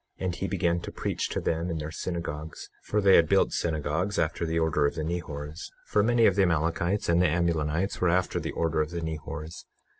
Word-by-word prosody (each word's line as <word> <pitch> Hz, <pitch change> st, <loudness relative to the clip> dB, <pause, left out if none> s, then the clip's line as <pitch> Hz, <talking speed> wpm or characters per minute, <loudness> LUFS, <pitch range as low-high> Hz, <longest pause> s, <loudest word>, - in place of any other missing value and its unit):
And 95 Hz, -1 st, -2 dB
he 95 Hz, -, -3 dB
began 85 Hz, -3 st, +1 dB
to -, -, -7 dB
preach -, -, -2 dB
to -, -, -2 dB
them 85 Hz, +2 st, -1 dB
in 85 Hz, -, -2 dB
their 75 Hz, 0 st, -5 dB
synagogues, 80 Hz, -3 st, -5 dB
for 105 Hz, -, +1 dB
they 100 Hz, -1 st, +7 dB
had 85 Hz, -2 st, +4 dB
built -, -, +3 dB
synagogues 80 Hz, +4 st, -1 dB
after 85 Hz, +1 st, 0 dB
the 80 Hz, +1 st, -1 dB
order 80 Hz, -3 st, +2 dB
of -, -, -4 dB
the 80 Hz, -, -2 dB
Nehors; 75 Hz, -2 st, -5 dB, 0.2 s
for 105 Hz, -, +2 dB
many 115 Hz, +1 st, +4 dB
of 100 Hz, -, +5 dB
the 100 Hz, -, +3 dB
Amalekites 85 Hz, +3 st, +1 dB
and 85 Hz, +1 st, +3 dB
the 90 Hz, -, +5 dB
Amulonites 85 Hz, +2 st, 0 dB
were 90 Hz, -, +3 dB
after 90 Hz, +1 st, +1 dB
the -, -, -4 dB
order 80 Hz, -1 st, 0 dB
of 75 Hz, -, -1 dB
the 85 Hz, 0 st, -4 dB
Nehors. 80 Hz, 0 st, -6 dB
85 Hz, 215 wpm, -27 LUFS, 80-90 Hz, 0.2 s, they